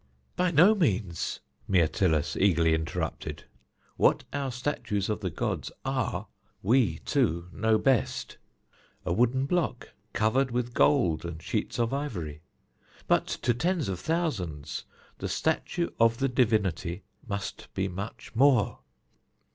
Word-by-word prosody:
"By 180 0 +2
no 175 +6 +6
means," 105 - -1 0.3
Myrtilus 85 -2 +2
eagerly 85 -4 +3
interrupted. 80 0 -3 0.5
"What - - +4
our 140 -2 -2
statues 120 -6 -2
of 105 - -1
the 95 -3 -2
gods 80 - -3
are - - -1 0.4
we 110 -6 +3
two 85 +2 +1
know 110 +1 +2
best: 130 -1 0 0.7
a - - +1
wooden 125 +6 +2
block, 160 -5 -1 0.2
covered 125 +5 +2
with 120 0 -2
gold 120 - +3
and 85 -2 -5
sheets - - -2
of 115 +1 0
ivory. 85 - -4 0.7
But - - +3
to 120 - 0
tens 170 +5 0
of 90 -2 -3
thousands 100 - -2 0.3
the - - -3
statue 175 -1 0
of 115 0 +4
the 135 - +1
divinity 100 -7 +1 0.2
must 100 -2 -5
be 95 0 0
much 100 +4 -7
more. 125 -3 +4
110 Hz, 125 wpm, -28 LUFS, 90-135 Hz, 0.7 s, no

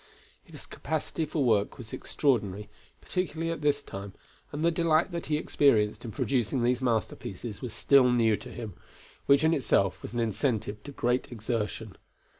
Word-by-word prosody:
His - - -12
capacity 160 +1 -3
for 150 -1 -1
work 110 -5 +2
was 115 -4 -10
extraordinary, 105 -7 0 0.3
particularly 165 -3 -2
at 165 - -4
this 145 -1 +1
time, 100 0 -7 0.4
and 150 +3 -2
the 170 - +4
delight 165 +1 +2
that 170 -4 -4
he 150 0 +1
experienced 115 -9 +2
in 120 - -5
producing 125 +2 0
these 125 +1 +2
masterpieces 110 -3 -2
was 125 - -4
still 135 -3 +5
new 115 -3 +3
to - - -9
him, 110 -5 -7 0.5
which 140 +1 +5
in 160 +1 +4
itself 100 - +1
was - - -8
an 120 - -1
incentive 110 -2 -1
to 145 - -7
great 125 -2 0
exertion. 110 -2 -3
125 Hz, 165 wpm, -28 LUFS, 110-145 Hz, 0.5 s, still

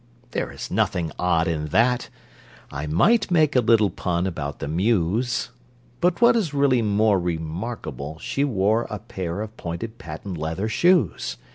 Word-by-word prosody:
There - - -2
is - - -7
nothing 85 -3 0
odd 85 -2 +2
in 75 -2 -1
that 120 +9 +2 0.6
(I 70 +2 -4
might 200 - +3
make 155 -5 +3
a - - +6
little 110 -4 +4
pun 85 +1 -1
about 75 -6 -4
the - - -5
Mews!) 100 - 0 0.5
But 175 +3 +1
what 235 0 +6
is 175 -11 0
really 140 -3 +3
more 105 -1 +3
Remarkable, 80 - -4
she 135 - -2
wore 110 -3 +1
A 105 - -4
pair 95 -1 -5
of 110 0 -7
pointed 90 +7 -6
patent 80 +3 -7
leather 80 +7 -2
shoes. 120 - +2
100 Hz, 155 wpm, -23 LUFS, 80-120 Hz, 0.6 s, a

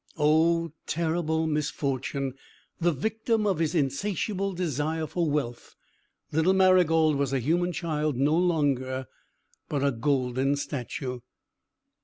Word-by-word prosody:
Oh, 165 +2 +3 0.2
terrible 160 0 0
misfortune! 140 -3 -2 0.5
The 175 0 +3
victim 220 - -1
of 190 -5 +1
his 160 0 0
insatiable 195 +7 -1
desire 160 -2 -1
for 170 0 -1
wealth, 135 -5 -3 0.6
little 160 +5 +3
Marygold 170 -5 +4
was 140 -1 -1
a 135 - +2
human 175 +8 +1
child 155 -3 -1
no 140 +5 +2
longer, 140 -7 +1 0.6
but 140 -2 -1
a 140 - +3
golden 130 +1 0
statue! 130 -2 -4
155 Hz, 115 wpm, -27 LUFS, 140-170 Hz, 0.6 s, Marygold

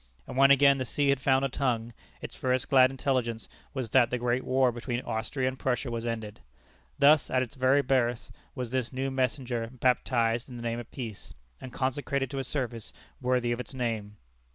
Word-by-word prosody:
And - - -8
when 135 +1 +6
again 140 0 +6
the - - 0
sea 140 +3 0
had 140 -1 +3
found 130 0 +2
a - - +2
tongue, 120 -3 -1 0.3
its - - -6
first 130 -1 -1
glad 130 -1 +7
intelligence 130 -4 -2 0.2
was 130 -5 -4
that 125 -3 +5
the 125 - -1
great 125 +1 0
war 130 -1 +2
between 120 +1 -3
Austria 130 +4 -2
and 130 0 -3
Prussia 125 -1 -1
was 115 0 -3
ended. 110 -3 -4 0.6
Thus 145 +1 +5
at 130 0 +2
its 120 - -8
very 135 +1 +3
birth 125 -3 0 0.2
was 125 -3 -4
this 130 -2 -1
new 135 +1 -2
messenger 125 -3 -1
baptized 120 -2 +1
in 125 - -9
the 120 - -7
name 115 0 -2
of 120 - -9
Peace, 115 -7 -8 0.3
and 130 - -8
consecrated 135 0 -2
to 135 - -3
a - - -2
service 125 -5 -4 0.3
worthy 125 -1 +1
of 120 - -1
its 130 +2 -7
name. 110 -4 -3
125 Hz, 200 wpm, -28 LUFS, 120-135 Hz, 0.6 s, glad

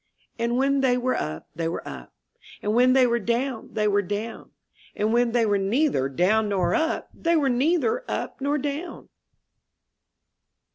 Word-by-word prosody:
And 235 +1 0
when 275 +1 +2
they 250 -2 +3
were 255 +1 0
up, 75 +1 -4
they 165 0 -2
were 165 - -5
up, - - -9 0.5
And 210 - 0
when 250 +2 +5
they 260 -1 +5
were 235 -1 +1
down, 235 +2 -2
they 210 -1 +1
were 205 0 +3
down; 205 +4 -5 0.5
And 215 +2 0
when 240 0 +3
they 235 -1 +2
were 205 -2 +2
neither 200 - +1
down 205 +9 +2
nor 185 -3 +1
up, 320 +1 -1
They 335 0 0
were 290 -4 +2
neither 340 - +1
up - - -4
nor 285 +2 +1
down. 295 +5 -5
240 Hz, 170 wpm, -25 LUFS, 205-275 Hz, 0.5 s, when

